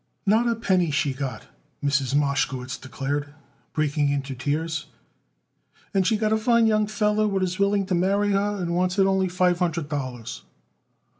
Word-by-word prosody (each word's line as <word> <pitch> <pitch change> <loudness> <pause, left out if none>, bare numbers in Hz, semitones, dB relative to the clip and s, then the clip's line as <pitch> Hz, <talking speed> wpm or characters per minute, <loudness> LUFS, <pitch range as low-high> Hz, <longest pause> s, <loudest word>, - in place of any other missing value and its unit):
"Not 220 +4 +3
a 235 - +2
penny 185 -6 +1
she 145 -2 0
got 135 -1 -5
it," - - -22 0.4
Mrs. 140 -1 +1
Mashkowitz 135 -2 0
declared, 145 +2 -4 0.4
breaking 150 -1 +1
into 140 -1 -2
tears. 155 +5 -2 1.1
"And 190 -2 +2
she 220 - +2
got 215 0 +1
a - - +3
fine 235 +1 +3
young 215 -1 +2
feller 215 0 +1
what 195 -2 0
is 185 0 -2
willing 200 0 +2
to 185 - -2
marry 200 +3 +2
her 200 +1 +1
and 170 -2 -2
wants 180 +1 0
it 195 - +5
only 190 -1 +2
five 180 -1 +2
hundred 170 -4 -1
dollars." 125 -5 -5
180 Hz, 170 wpm, -24 LUFS, 145-200 Hz, 1.1 s, it